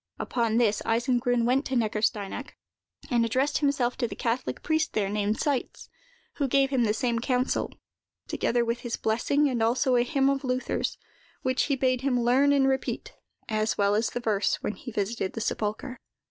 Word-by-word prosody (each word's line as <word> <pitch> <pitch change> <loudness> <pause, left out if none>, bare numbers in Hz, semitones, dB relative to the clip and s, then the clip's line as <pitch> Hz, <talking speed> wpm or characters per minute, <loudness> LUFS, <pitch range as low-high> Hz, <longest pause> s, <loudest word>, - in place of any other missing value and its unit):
Upon 230 -2 0
this, 220 -4 +2
Eisengrun 240 +1 +1
went 260 +3 +2
to 265 - -2
Neckarsteinach, 215 +1 -1 0.6
and 240 -1 +3
addressed 260 +5 +1
himself 280 -4 +1
to 240 - 0
the - - -7
catholic 240 +2 -2
priest 315 -1 0
there, 200 -2 0
named 210 +1 0
Seitz, 280 -4 -2 0.5
who 280 - +1
gave 270 +1 +2
him 250 -4 +2
the 210 - +2
same 235 -1 0
counsel, 250 +2 0 0.6
together 240 0 0
with 235 +1 -1
his 240 -1 -4
blessing 275 +7 +1
and 250 -4 -1
also 250 +3 +2
a 240 - +4
hymn 275 +1 +1
of 275 0 +1
Luther's, 255 0 -1 0.5
which 255 0 +1
he 280 - +1
bade 255 -1 +1
him 265 -2 +1
learn 255 +4 +4
and 275 -1 +4
repeat, 265 -1 -2 0.3
as 215 0 0
well 200 0 +3
as 220 +2 +1
the 245 - -4
verse, 215 -4 +1
when - - -1
he 250 - -9
visited 205 -1 -2
the 225 - -4
sepulchre. 220 +5 -3
245 Hz, 180 wpm, -27 LUFS, 225-265 Hz, 0.6 s, a